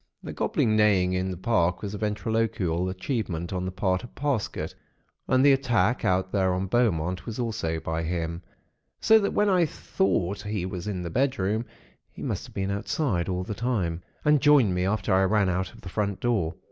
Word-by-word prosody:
"The - - -6
gobbling 110 -1 +1
neighing 100 -4 +3
in 95 +1 -1
the 90 - -4
park 90 -2 +1
was 100 -1 -4
a 105 - -5
ventriloquial 105 -4 -1
achievement 95 - -3
on 90 0 -2
the 95 - -3
part 95 +1 0
of 120 - -11
Parsket; 140 -6 -2 0.5
and 130 +1 +4
the 140 - +8
attack 125 -2 +1
out 95 0 +1
there 95 -2 +2
on 95 +1 -1
Beaumont 90 -5 0
was 115 - -5
also 105 -10 -2
by 80 +1 -3
him; 85 0 -3 0.6
so 220 0 +6
that 200 - -1
when 210 - +3
I 180 -4 +3
thought 95 -6 -1
he 105 -3 -3
was 90 0 -5
in 95 -4 -3
his 85 -1 -5
bedroom, 120 -4 0 0.4
he - - -10
must - - -3
have - - -17
been 95 0 -1
outside 100 - -1
all 90 0 -1
the 105 - -4
time, 100 -8 -1 0.2
and 150 -2 +4
joined 145 -10 +5
me 90 0 0
after 100 -2 0
I 95 - +4
ran 105 -1 +2
out 95 +1 -1
of - - -16
the - - -10
front 100 0 -2
door. 105 -10 0
95 Hz, 195 wpm, -26 LUFS, 90-115 Hz, 0.6 s, the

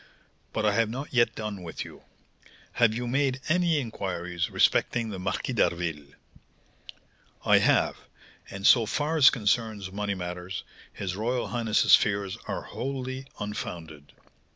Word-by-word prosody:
But 110 - -1
I 105 - +3
have 115 0 +2
not 135 +6 -6
yet 120 -1 +3
done 105 -3 -5
with 85 -2 -6
you. - - -12 0.7
Have 115 -3 +3
you 120 +1 -3
made 135 +1 +1
any 170 -2 +3
inquiries 90 -8 -3
respecting 115 -2 +2
the 95 - -5
Marquis 95 +7 -2
d'Harville?" 85 -9 -1 1.3
"I - - +6
have; - - +3 0.5
and, 100 0 -6
so 115 -2 +6
far 150 +6 -1
as 140 -4 +9
concerns 110 -4 -1
money 100 0 -2
matters, 90 +1 -5 0.3
his 90 -2 -4
royal 115 +1 -1
highness's 115 -1 +2
fears 100 -2 -1
are - - -3
wholly 130 0 -5
unfounded. 80 -7 -6
M. - - -32
105 Hz, 140 wpm, -27 LUFS, 95-125 Hz, 1.3 s, as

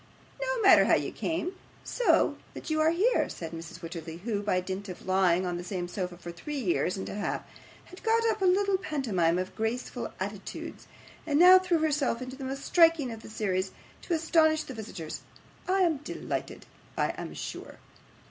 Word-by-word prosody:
'No - - -1
matter 395 - +8
how - - +5
you - - -1
came, 335 +3 -2 0.3
so - - +2 0.2
that - - -6
you 310 0 +2
are 315 - +5
here,' 400 +9 +2
said 165 -2 -6
Mrs. 170 +2 -8
Wititterly, 165 0 -7
who, 210 -1 -2
by 200 -3 +1
dint 190 +2 -5
of 180 - -9
lying 185 -1 +3
on 175 -1 -2
the 175 - -5
same 180 -1 -3
sofa 180 -1 -4
for 175 0 -8
three 285 - -6
years 185 -5 0
and 190 - -5
a - - -5
half, 205 0 -2 0.4
had 365 - -13
got 455 0 +2
up 435 - -4
quite 380 -2 +4
a - - +6
little 395 0 +2
pantomime 220 - 0
of 185 0 -4
graceful 225 +3 -3
attitudes, - - -6 0.4
and 290 -2 +2
now 365 +3 +9
threw 365 -2 +1
herself 295 -6 +1
into 255 +1 -6
the 270 - -8
most 270 +1 -4
striking 330 -7 +4
of 225 -1 -8
the - - -11
whole 215 - -12
series, 190 -2 -1 0.3
to 350 - -3
astonish 315 -1 +3
the 265 - -8
visitors. 205 -8 -7 0.5
'I 380 +1 +2
am 335 -4 +3
delighted, 290 - -5 0.3
I - - +2
am - - -6
sure. - - -7
250 Hz, 195 wpm, -29 LUFS, -, 0.5 s, now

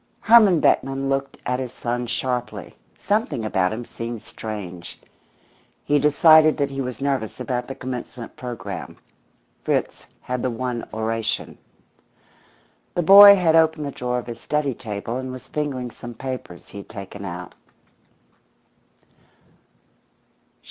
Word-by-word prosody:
Herman 215 -7 +6
Beckman 135 0 +1
looked 135 0 -2
at 125 +1 -1
his 130 -2 -4
son 120 0 -3
sharply; 125 0 -3 0.2
something 210 - -1
about 95 -3 +1
him 115 +2 -5
seemed 115 -1 -7
strange. 100 -7 -8 0.8
He 145 0 +2
decided 155 +2 +6
that 140 -2 -1
he 135 0 -3
was 125 -3 -5
nervous 135 -6 -2
about 125 -1 -3
the 135 - -6
commencement 125 -2 -7
programme. 125 -2 -7 0.7
Fritz - - -2
had 125 -1 -3
the 130 - 0
one 125 0 -4
oration. 110 0 -2 1.4
The 175 - +1
boy 200 +3 +10
had 170 -4 +3
opened 160 -2 +3
the 140 - -4
drawer 125 -1 -3
of 125 - -4
his 115 -1 -8
study 150 -3 -1
table 110 +1 -5
and 130 0 -5
was 130 0 -10
fingering 135 -5 -3
some 120 +1 -10
papers 130 -9 -7
he 100 - -9
had 100 - -12
taken 100 -1 -9
out. 90 -2 -7
125 Hz, 135 wpm, -22 LUFS, 115-145 Hz, 1.4 s, boy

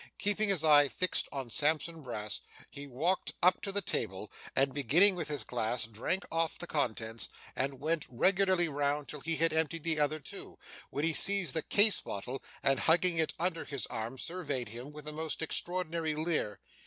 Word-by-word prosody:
Keeping 205 +1 0
his 185 -5 +1
eye 145 -2 +7
fixed 185 +6 -1
on 135 -4 -5
Sampson 155 +3 +2
Brass, 110 -5 -3 0.3
he 140 0 -8
walked 160 +9 -1
up 180 +1 +5
to 200 - -3
the 205 0 -1
table, 95 +2 -3 0.2
and 135 0 +3
beginning 160 - +5
with 165 -4 -3
his 150 -2 -2
glass, 120 -1 -2
drank 115 - -3
off 165 0 0
the 175 - -7
contents, 115 -7 0 0.3
and 135 0 -1
went 155 +2 -1
regularly 185 +6 +3
round 145 0 0
until 150 +1 -7
he 165 +3 -1
had 165 0 +1
emptied 160 0 0
the 160 -2 +5
other 150 +1 +1
two, 145 - -10 0.3
when 145 - -3
he 165 0 +2
seized 195 -5 +3
the 160 - 0
case 205 +6 +5
bottle, 125 +7 -5 0.2
and 135 -1 +3
hugging 170 +1 +4
it 160 - 0
under 170 -1 -1
his 140 -6 -2
arm, 115 +4 -4
surveyed 145 - -3
him 120 +6 -8
with 150 0 -10
a - - 0
most 160 0 -3
extraordinary 165 -2 -2
leer. 155 - -2
155 Hz, 185 wpm, -31 LUFS, 135-170 Hz, 0.3 s, eye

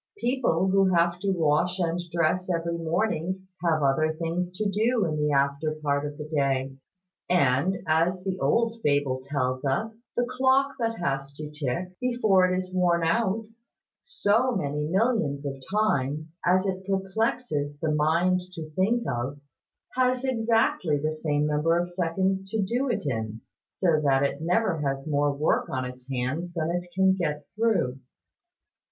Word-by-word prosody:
People 240 - +1
who 195 -1 +4
have 170 +1 +2
to 200 +2 -1
wash 170 +1 +1
and 175 -1 0
dress 175 +2 +1
every 170 -1 -1
morning 180 +2 -1 0.2
have 160 -3 +2
other 155 +3 +2
things 170 +2 -2
to 210 +3 -1
do 220 +3 +1
in 155 -2 -1
the 150 0 +1
after 140 +2 +1
part 145 -1 -1
of 145 0 -8
the 150 - -5
day; 135 -3 -1 0.5
and, 175 +2 +3
as 170 +4 +2
the 190 -1 -1
old 230 +11 +1
fable 145 -4 +1
tells 130 -2 -2
us, 220 +12 -2 0.2
the 245 - +2
clock 260 +2 +2
that 230 -1 0
has 140 -4 -2
to 150 0 -7
tick, 150 +4 -3
before 220 -7 +3
it 185 - +1
is 185 0 -4
worn 175 -2 +2
out, 215 +5 +1 0.5
so 245 - +1
many 145 -4 -1
millions 185 - +1
of 135 -1 -5
times, 155 -5 0
as 185 +2 +3
it 190 -1 -2
perplexes 195 - -1
the 155 0 0
mind 170 +5 +2
to 155 -1 -7
think 215 +9 +1
of, 130 +4 -3 0.6
has 255 0 +2
exactly 225 - +1
the 155 +2 -1
same 150 -1 0
number 150 +3 +2
of 175 0 0
seconds 190 +2 -1
to 220 - -2
do 240 +7 0
it 240 - -1
in; 110 -4 -3 0.3
so 165 -5 +1
that 135 -1 +3
it 140 0 -1
never 180 +1 +1
has 135 0 -2
more 145 -1 +2
work 140 +2 0
on 130 -1 -2
its 125 +1 -9
hands 140 +8 -2
than 165 -1 -1
it 175 0 -2
can 190 0 +4
get 150 -5 -2
through. 210 - +1
170 Hz, 160 wpm, -26 LUFS, 145-195 Hz, 0.6 s, who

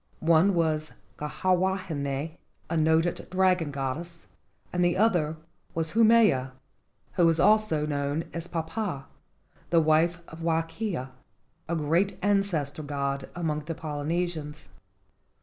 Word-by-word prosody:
One 170 +4 +4
was 155 -2 0 0.3
Kiha 150 +5 0
wahine, 165 -6 -2 0.4
a - - 0
noted 160 +2 +2
dragon 185 -4 +2
goddess, 145 +5 -5 0.5
and 180 0 +2
the 175 +1 +2
other 175 -7 +2 0.4
was 165 -1 -1
Haumea, 215 - +4 0.6
who 175 -3 +4
was 165 -1 +2
also 210 -7 +3
known 145 +1 -1
as 170 0 -5
Papa, 165 -3 -3 0.6
the 170 - +4
wife 160 +2 +3
of 165 - -11
Wakea, 165 - -2 0.6
a 170 - 0
great 170 +6 +1
ancestor 195 -8 0
god 140 -2 -3
among 160 -3 -1
the 165 +1 -4
Polynesians. 155 - -3
165 Hz, 115 wpm, -27 LUFS, 150-180 Hz, 0.6 s, One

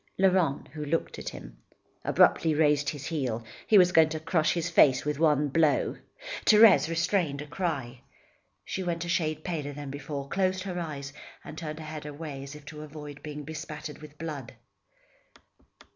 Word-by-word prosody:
Laurent 185 -7 +2
who 150 +1 -6
looked 155 +3 -2
at - - -4
him, - - -11 0.5
abruptly 160 -2 +4
raised 145 -2 +3
his 145 -2 -6
heel. 130 -8 -2 0.2
He 215 - +6
was 180 -2 +6
going 160 -3 +6
to 155 0 -3
crush 160 -1 +1
his 170 -1 -1
face 140 -6 +4
at 150 -1 -1
one 150 -2 +3
blow. 155 0 +2 0.5
Thérèse 210 -6 +7
restrained 165 -3 0
a 150 - -5
cry. 140 -8 -3 0.6
She 190 - -3
went 175 -2 -2
a - - -6
shade 155 -3 0
paler 150 -5 -3
than 145 -1 -7
before, 140 0 -5
closed 185 +2 0
her 180 -2 -4
eyes 145 -4 -5 0.3
and - - -9
turned 155 -2 -5
her 160 - -8
head 155 -1 -7
away 145 -2 -7
as 140 +2 -8
if 150 -1 -12
to 150 +1 -9
avoid 150 -1 -9
being 150 -1 -7
bespattered 150 0 -7
with 150 -1 -13
blood. 150 -6 -6
155 Hz, 175 wpm, -28 LUFS, 145-165 Hz, 0.6 s, Thérèse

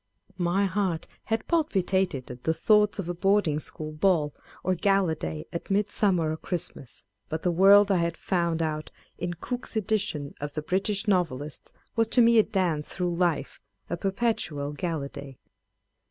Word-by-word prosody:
My 180 +3 +2
heart 185 -4 -1 0.2
had 225 0 -1
palpi 310 - +1
tated 185 -10 -1
at 125 0 -10
the 160 - +1
thoughts 210 +1 +3
of 195 -4 -4
a 175 - -1
boarding 190 -4 +2
school 155 0 -7
ball, 155 -2 +2 0.3
or 185 - +2
gala 195 -2 +2
day 80 - -5
at 170 - -5
Midsummer 195 -4 +2
or 155 - -3
Christmas: 160 -7 -4 0.2
but 160 0 -3
the 180 - +2
world 200 +3 +6
I 190 - +4
had 170 0 -1
found 170 -3 0
out 155 -1 -3 0.3
in 175 0 -3
Cooke's 245 +8 -5
edition 205 -9 -1
of 145 0 -5
the 155 - -3
British 195 +5 -1
Novelists 155 -7 -1 0.2
was 225 -1 +3
to 250 - +4
me 230 0 +6
a - - +7
dance 175 -8 -1
through 180 -2 -2
life, 170 -3 -1 0.3
a - - +1
perpetual 190 -7 -1
gala 160 -3 -2
day. 140 -2 -10
175 Hz, 170 wpm, -27 LUFS, 155-200 Hz, 0.3 s, a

